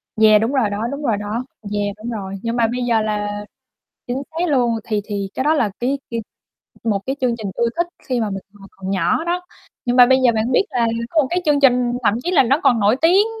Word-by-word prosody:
Yeah, 215 Hz, -1 st, +6 dB
đúng 225 Hz, +3 st, 0 dB
rồi 255 Hz, -7 st, +2 dB
đó, 205 Hz, +3 st, -2 dB
đúng 280 Hz, +1 st, -5 dB
rồi 225 Hz, -7 st, +1 dB
đó. 210 Hz, +4 st, -3 dB, 0.3 s
Yeah, 205 Hz, -1 st, -1 dB
đúng 220 Hz, +3 st, -7 dB
rồi, 195 Hz, -4 st, -5 dB
nhưng 230 Hz, 0 st, -2 dB
mà 235 Hz, -2 st, +3 dB
bây 245 Hz, +2 st, -3 dB
giờ 230 Hz, -2 st, +2 dB
là 205 Hz, -1 st, -3 dB, 0.6 s
chính 255 Hz, +2 st, -3 dB
xác 335 Hz, +2 st, -1 dB
luôn 245 Hz, -5 st, +2 dB
thì 215 Hz, -2 st, -1 dB
thì 200 Hz, -2 st, -3 dB
cái 260 Hz, -, -2 dB
đó 305 Hz, +2 st, +3 dB
là 235 Hz, -9 st, +1 dB
cái 265 Hz, +3 st, 0 dB
cái 230 Hz, -1 st, -2 dB, 0.6 s
một 210 Hz, -4 st, +1 dB
cái 270 Hz, +1 st, -2 dB
chương 250 Hz, -2 st, +1 dB
trình 210 Hz, -3 st, -4 dB
ưa 235 Hz, -, +1 dB
thích 345 Hz, 0 st, +1 dB, 0.2 s
khi 250 Hz, -2 st, 0 dB
mà 220 Hz, -2 st, -1 dB
mình 195 Hz, -1 st, -5 dB
hồi 195 Hz, -1 st, -14 dB
còn 190 Hz, 0 st, -7 dB
nhỏ 190 Hz, -, +1 dB
đó, 350 Hz, +1 st, -1 dB, 0.4 s
nhưng 245 Hz, 0 st, 0 dB
mà 250 Hz, -1 st, +9 dB
bây 260 Hz, +1 st, +4 dB
giờ 240 Hz, -, +5 dB
bạn 220 Hz, +3 st, 0 dB
biết 250 Hz, -, +4 dB
là 240 Hz, -2 st, +1 dB, 0.2 s
có 320 Hz, -2 st, +3 dB
một -, -, -1 dB
cái 355 Hz, 0 st, 0 dB
chương 295 Hz, -2 st, +3 dB
trình 250 Hz, -3 st, +4 dB
thậm 205 Hz, -, +3 dB
chí 355 Hz, -, 0 dB
là 360 Hz, -, +5 dB
nó 270 Hz, +5 st, +2 dB
còn 235 Hz, -3 st, +4 dB
nổi 210 Hz, +4 st, +3 dB
tiếng, 375 Hz, +6 st, +5 dB
235 Hz, 255 wpm, -20 LUFS, 210-265 Hz, 0.6 s, mà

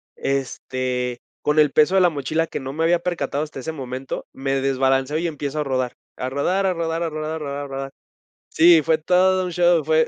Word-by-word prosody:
este, 130 Hz, -2 st, -2 dB, 0.2 s
con 150 Hz, +1 st, +2 dB
el 150 Hz, -2 st, +5 dB
peso 155 Hz, +5 st, +4 dB
de 190 Hz, -, +5 dB
la 180 Hz, -, +5 dB
mochila 155 Hz, +2 st, -1 dB
que -, -, -5 dB
no 135 Hz, 0 st, -6 dB
me 160 Hz, +2 st, -1 dB
había 170 Hz, +1 st, +3 dB
percatado 170 Hz, -4 st, -2 dB
hasta 150 Hz, -3 st, -8 dB
ese 135 Hz, -, -4 dB
momento, 130 Hz, -3 st, -6 dB
me 135 Hz, 0 st, -1 dB
desbalanceo 135 Hz, +1 st, +1 dB
y 170 Hz, +2 st, -1 dB
empiezo 150 Hz, -2 st, -4 dB
a -, -, +1 dB
rodar. 130 Hz, -3 st, -1 dB, 0.2 s
A 130 Hz, -, -3 dB
rodar, 180 Hz, +9 st, 0 dB
a 185 Hz, -, +2 dB
rodar, 165 Hz, 0 st, -2 dB
a 165 Hz, -, -1 dB
rodar, 155 Hz, 0 st, -4 dB
a -, -, -5 dB
rodar, 140 Hz, -1 st, -5 dB
rodar. 135 Hz, 0 st, -5 dB, 0.6 s
Sí, 165 Hz, -1 st, +6 dB
fue 160 Hz, +2 st, +2 dB
todo 185 Hz, +3 st, +3 dB
un 180 Hz, -, -4 dB
show, 175 Hz, -1 st, +3 dB
fue 160 Hz, 0 st, +3 dB
150 Hz, 215 wpm, -22 LUFS, 135-165 Hz, 0.6 s, Sí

